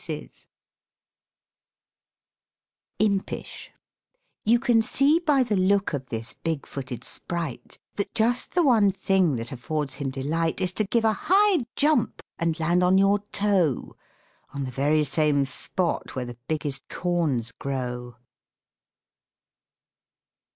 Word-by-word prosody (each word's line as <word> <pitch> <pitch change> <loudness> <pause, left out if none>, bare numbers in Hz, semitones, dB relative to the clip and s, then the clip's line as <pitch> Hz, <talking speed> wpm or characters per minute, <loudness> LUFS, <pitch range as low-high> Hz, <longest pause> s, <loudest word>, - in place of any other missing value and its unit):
IMPISH 200 -2 -2 0.7
You 230 +3 +4
can 240 -3 +3
see 280 +8 +3
by 295 -6 +3
the 220 -4 -1
look 195 0 +2
of 135 -3 -3
this 115 0 -5
big 160 -4 -3
footed 130 -3 -6
Sprite, 170 -7 -4 0.2
That 200 - -2
just 235 +6 +1
the 355 - +4
one 225 -8 +5
thing 185 -6 +2
that 115 +3 -5
affords 140 +2 -3
him 140 -2 -2
delight 155 +6 -1
Is 185 -2 0
to 215 - 0
give 225 +3 +1
a 220 - +4
high 385 - +3
jump 295 -5 +1 0.2
and 170 -1 0
land 170 +2 +2
on 180 +1 +4
your 195 +1 +4
toe, 195 - +1 0.6
On 140 - -2
the 130 - -4
very 145 +4 +2
same 145 -1 +2
spot 170 +6 -3
where 130 -1 -2
the 120 0 -9
biggest 145 -4 -3
corns 160 -10 -1
grow. 125 -3 -4
170 Hz, 125 wpm, -25 LUFS, 140-210 Hz, 0.7 s, one